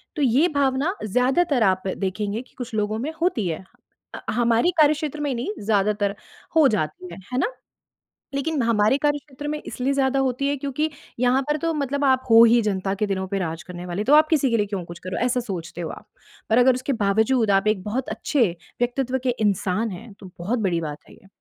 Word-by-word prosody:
तो 300 - -2
ये 270 +5 +4
भावना 280 +6 +1
ज़्यादातर 255 - +2
आप 185 -2 +2
देखेंगे 200 +3 -2
कि 255 - -20
कुछ 245 -1 -6
लोगों 215 +1 -1
में 285 +7 -3
होती 340 - +1
है। 165 +2 -4 0.5
अ, - - -6
हमारी 235 +7 +3
कार्यक्षेत्र 305 0 +2
में 290 -2 -1
नहीं, 240 +8 -3
ज़्यादातर 205 -1 +1 0.4
हो 310 -3 +7
जाती 180 -4 -2
है, 175 - -9
है - - 0
ना? 470 - 0 0.8
लेकिन 280 0 -1
हमारे 225 +1 +3
कार्यक्षेत्र 290 -1 -2
में 300 0 -3
इसलिए 260 +2 -1
ज़्यादा 275 0 +1
होती 265 +1 0
है 285 - 0
क्योंकि 285 +3 -2 0.3
यहाँ 250 +2 +3
पर 295 - +2
तो 330 +2 -1
मतलब 285 -1 -1
आप 260 -1 +3
हो 225 0 +9
ही 235 +1 +5
जनता 195 -2 -1
के 210 +2 -1
दिनों 190 -1 -2
पे 195 - -1
राज 165 -2 -3
करने 180 -1 -8
वाले, 180 +4 -3
तो 280 - +5
आप 310 +1 +6
किसी 285 -5 +2
के 230 - +3
लिए 210 -2 +1
क्यों 195 -3 -4
कुछ 170 0 -10
करो, 185 - -4
ऐसा 250 0 +1
सोचते 180 -7 -6
हो 165 - -4
आप, - - -10 0.4
पर 225 - +4
अगर 250 +1 +5
उसके 255 +3 -2
बावजूद 220 +3 +2
आप 195 +1 +3
एक 210 -3 +1
बहुत 245 +5 -3
अच्छे 240 +4 +1 0.4
व्यक्तित्व 255 +1 0
के 255 - +2
इंसान 210 +1 0
हैं, 215 +4 -9
तो 195 -2 -13
बहुत 210 +9 -1
बड़ी 185 -6 0
बात 150 -2 -5
है - - -15
ये। - - -20
235 Hz, 215 wpm, -23 LUFS, 200-275 Hz, 0.8 s, हो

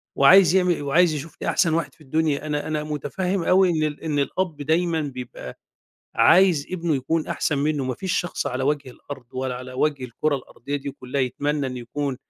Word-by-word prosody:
وعايز 180 +5 +7
يعمل 180 -4 +2
وعايز 160 +4 +3
يشوفني 150 +2 -5
أحسن 165 -4 +2
واحد 155 -5 -1
في 165 - -25
الدنيا. 155 0 0
أنا 150 -1 -2
أنا 155 -1 -2
مُتفهِّم 170 +5 -2
أوي 185 +2 +4
إن 160 -3 +1
ال 150 -1 -3
إن 150 -3 0
الأب 165 +3 -1
دايمًا 160 +2 +1
بيبقى 125 - -7 0.6
عايز 165 +5 +5
ابنه 170 -3 -1
يكون 155 +4 -1
أحسن 145 - -1
منُّه، 145 -1 0
ما 130 0 -2
فيش 185 +7 -2
شخص 175 - -4
على 130 +1 -2
وَجه 145 -2 -1
الأرض 130 0 -10
ولا 130 0 -3
على 130 +1 -8
وَجه 135 0 0
الكُرة 140 +5 -1
الأرضية 140 +2 -6
دي 140 0 -5
كُلّها 135 0 -4
يتمنّى 145 +3 -1
إن 130 -1 -5
يكون 130 +3 -3
145 Hz, 190 wpm, -23 LUFS, 135-165 Hz, 0.6 s, وعايز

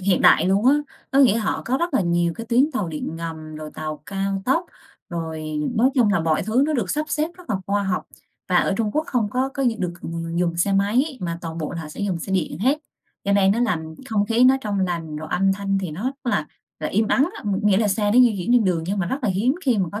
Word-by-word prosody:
hiện 185 -1 +2
đại - - +6
luôn 200 +5 +2
á. 275 - +7 0.4
Có 270 - +2
nghĩa 245 -6 +6
họ 220 - -1
có 255 +3 +1
rất 340 -4 -1
là - - +4
nhiều 170 -1 +1
cái 230 0 -6
tuyến 260 +6 +3
tàu 205 -9 -1
điện 160 +1 -5
ngầm, 160 -2 -6
rồi 155 0 -7
tàu 155 -1 -5
cao 195 0 -2
tốc, 330 +7 +1 0.4
rồi 160 -2 -4 0.3
nói 250 +5 +4
chung 225 -6 +4
là 175 - +2
mọi 160 -1 +1
thứ 230 +5 +2
nó 310 - 0
được 255 -6 -1
sắp 305 +1 0
xếp 305 +2 0
rất 360 -1 -11
là 205 - +1
khoa 200 0 +1
học. 190 -2 -1 0.4
Và 180 - +3
ở 195 - +2
Trung 215 -2 0
Quốc 310 +1 0
không 230 -5 0
có 260 +3 0
có 275 - -1
gi 235 -3 +2
được 180 -2 -2
v - - -6 0.3
dùng 170 -1 0
xe 195 +3 +1
máy 240 +9 +1
mà 170 -1 -3
toàn 165 -1 -6
bộ 155 - -3
là 170 - -4
họ 150 - -8
sẽ 155 - -9
dùng 195 -4 -1
xe 190 - -5
điện 170 -4 -1
hết, 265 +8 +2 0.5
cho 200 - +1
nên 195 -1 +4
nó 230 - -1
làm 160 -9 -1
không 205 -2 +1
khí 235 +2 +3
nó 265 +1 +6
trong 205 -4 -2
lành, 165 -4 -2
rồi 155 +1 -6
âm 195 +2 +2
thanh 195 0 -1
thì 185 -4 -4
nó 170 +8 -6
rất 265 - -1
là 240 - 0 0.3
là - - -2
im 215 +2 +1
ắng 275 +5 +3
á, - - -9
ngh 200 -2 0
nghĩa 205 -2 +4
là 215 -1 +2
xe 205 +1 +1
nó 240 - +4
di 240 -4 +6
chuyển 185 +7 0
trên 245 -3 +5
đường 175 -4 +1
nhưng 200 +2 -1
mà 180 - 0
rất 265 - -2
là - - +2
hiếm 210 +9 +1
khi 250 -6 +2
mà 185 -4 0
có 205 - -4
200 Hz, 280 wpm, -22 LUFS, 175-240 Hz, 0.5 s, á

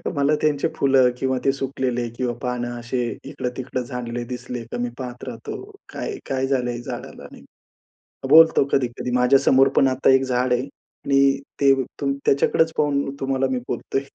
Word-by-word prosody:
मला 145 +1 +2
त्यांचे 150 0 +1
फुलं 135 -2 +4
किंवा 130 0 0
ते 135 - +5
सुकलेले 130 -3 -2
किंवा 125 -2 -1
पान 125 -2 -2
असे 120 +1 -3 0.2
इकडं-तिकडं 130 -2 -4
झाडले 120 -1 -5
दिसले 125 0 -6
की 115 - -7
मी 120 - -1
पाहत 125 -2 -7
राहतो, 115 -2 -6 0.3
काय-काय 135 - -3
झालंय 125 -3 -1
झाडाला, - - -8
नाही? - - -14 0.9
बोलतो 160 0 +7
कधी-कधी 125 -1 -1
माझ्यासमोर 130 +1 +4
पण 135 - +5
आता 130 +1 +2
एक 130 0 +4
झाड 125 -1 0
आहे 125 - +1 0.4
आणि 140 0 +3 0.2
ते 140 -1 +6 0.3
तू 140 -1 +1
त्याच्याकडेच 160 +3 +3
पाहून 140 -2 0
तुम्हाला 135 0 0
मी 130 - 0
बोलतोय. 135 - -2
130 Hz, 155 wpm, -22 LUFS, 125-135 Hz, 0.9 s, बोलतो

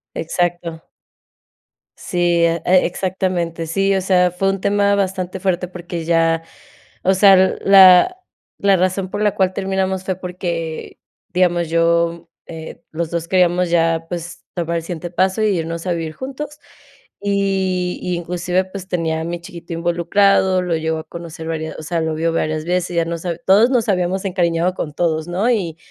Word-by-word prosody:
Exacto. 170 0 -2 1.2
Sí, 180 - -6 0.3
e 165 0 0 0.2
exactamente. 175 -3 -2
Sí, 195 +4 +1
o 190 - +1
sea, 180 -1 +3
fue 195 +2 0
un 195 -1 -2
tema 200 0 +2
bastante 185 -1 -2
fuerte 180 -1 -1
porque 175 -2 -6
ya, 165 -1 +2 0.6
o 190 - +4
sea, 195 0 +7 0.3
la 195 - +7 0.4
la 200 -1 +4
razón 185 +1 0
por 205 - -4
la 210 - +2
cual 190 -1 +1
terminamos 190 -1 -1
fue 185 - -1
porque, 175 -3 -5 0.3
digamos, 175 -2 +2
yo, 170 0 +1 0.2
mm, - - -10
eh, 160 -1 -9
los 165 0 -3
dos 170 -1 -3
queríamos 180 -1 +2
ya, 165 -1 +2
pues, 170 -1 -6
tomar 170 -1 -2
el 165 - -4
siguiente 175 0 -5
paso 190 +4 +1
y - - +3
irnos 165 +2 -4
a 175 - +1
vivir 160 -2 -4
juntos. 290 - -7 0.6
Y, 190 -3 0
y, 180 - -2
inclusive, 180 +2 -1
pues, 190 0 -8
tenía 165 -3 -1
a - - -3
mi 170 0 -4
chiquito 170 0 -9
involucrado. 185 +3 +2
Lo 180 -2 -1
llegó 160 0 -2
a - - -7
conocer 170 -1 -8
varias 160 -1 -4
o - - -8
sea, 165 +1 -2
lo 160 0 -1
vio 165 +1 0
varias 155 -1 -1
veces, 180 0 -1
ya 170 - +3
nos 170 +1 -5
hab 170 -1 -3
todos 210 +6 +6
nos 235 -4 +1
habíamos 185 0 0
encariñado 175 -1 +1
con 150 -5 -4
todos, 160 -1 -1
¿no? 190 +7 0
Y 170 -8 -1
175 Hz, 170 wpm, -19 LUFS, 165-190 Hz, 1.2 s, sea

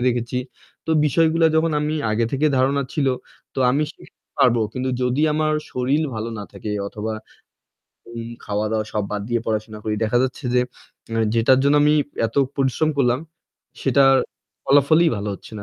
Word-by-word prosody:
দেখেছি। 120 0 -2 0.5
তো - - -2 0.2
বিষয়গুলা 165 +2 +3
যখন 160 +1 +2
আমি 150 +1 -1 0.2
আগে 110 +2 +1
থেকে 140 +3 +2
ধারণা 135 +2 +2
ছিল, 150 -3 0 0.5
তো - - -2
আমি 140 +4 +1
শিখতে - - -19 0.2
পারবো। 120 -2 +4
কিন্তু 130 0 -3
যদি 125 +4 +1
আমার 155 0 +1 0.2
শরীর 130 +5 +1
ভালো 110 +1 -3
না 105 - -5
থাকে 100 +1 -6 0.2
অথবা 110 +2 -4 0.9
ঘুম, 115 0 -7 0.2
খাওয়া-দাওয়া 105 +1 -1
সব 105 -1 -1
বাদ 105 - -2
দিয়ে 120 -1 0
পড়াশোনা 110 -1 -3
করি। 110 - -1
দেখা 110 +3 +2
যাচ্ছে 130 +3 -3
এ - - -1
যে 125 - +5 0.7
যেটার 115 +3 +4
জন্য 140 +1 +3
আমি 150 +1 +4 0.3
এত 115 - -11 0.2
পরিশ্রম 140 +3 +1
করলাম 125 -2 +3 0.6
সেটার 135 0 +5 0.5
ফলাফলই 150 +4 +5
ভালো 105 +1 -4
হচ্ছে 100 - -13
না। - - -7
125 Hz, 165 wpm, -22 LUFS, 110-145 Hz, 0.9 s, যে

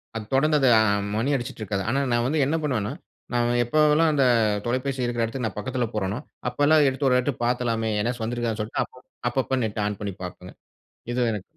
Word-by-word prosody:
அத 110 -2 -5
தொடர்ந்து 150 +3 +3
அது 135 - +3
அ - - +5 0.4
மணி 115 +5 0
அடிச்சிட்டுருக்காது. 110 -6 -3
ஆனா, 135 +4 +1
நான் 120 0 +2
வந்து 155 +3 0
என்ன 145 +4 0
பண்ணுவனா, 115 -8 -1 0.4
நான் 120 0 +2
எப்போவலாம் 155 +4 +4
அந்த 140 -2 +3 0.4
தொலைபேசி 130 +2 -1
இருக்குற 120 -1 -1
இடத்துக்கு 115 +1 -3
நான் - - -8
பக்கத்துல 125 +1 -2
போறனோ, 105 +2 -1 0.3
அப்பலாம் 145 +4 +4
எடுத்து 135 +1 -1
ஒரு 125 0 +4
எட்டு 140 +3 -1
பார்த்தலாமே 115 -2 0
என்னாச்சு 120 +1 -2
வந்திருக்காதுன்னு 115 -2 -2
சொல்ட்டு 110 - -2 0.5
அப்பப்போ 130 0 0
Net 105 - -5
ஆன் 105 -2 -4
பண்ணி 100 -2 -3
பார்ப்பேங்க. 90 0 -8 0.6
இது 120 -1 +1
எனக்கு 105 -3 -4
120 Hz, 180 wpm, -25 LUFS, 110-135 Hz, 0.6 s, அ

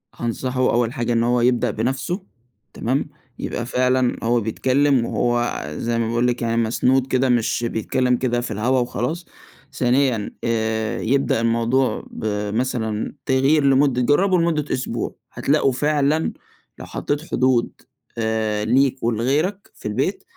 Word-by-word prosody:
هانصحه 125 +2 -3
أول 120 0 +1
حاجة 120 0 -1
إن 115 0 +2
هو 120 0 +2
يبدأ 125 -1 +2
بنفْسه 135 - -2 0.5
تمام، 135 +5 -1 0.3
يبقى 120 - -3
فعلًا 125 0 +1
هو 120 +1 +2
بيتكلّم 130 +4 +2
وهو 120 0 0
زي 115 0 -1
ما 115 - 0
باقول 120 +1 +1
لِك 120 0 -1
يعني 115 0 0
مسنود 130 +3 +2
كده 130 0 +1
مش 120 0 +1
بيتكلّم 125 +3 0
كده 120 -1 0
في 120 - -5
الهوا 120 +5 +1
وخلاص، 125 - -2 0.5
ثانيًا 125 -3 +1
آآ 110 -1 -1
يبدأ 135 -1 +1
الموضوع 115 +3 +1
بمثلًا 110 +1 -2
تغيير 135 +3 +3
لمُدّة 135 -2 +3
جرّبوا 180 +8 +3
لمُدّة 165 -3 +1
أسبوع، 120 -2 -3 0.2
هتلاقوا 140 -1 +2
فعلًا 150 +3 +1 0.5
لو - - -7
حطيت 145 +1 -3
حدود 125 -2 +2 0.5
آآ 110 -2 -1
ليك 130 +3 +2
ولغيرك 140 - 0
في - - -7
البيت، 135 - -1
125 Hz, 135 wpm, -21 LUFS, 115-135 Hz, 0.5 s, تغيير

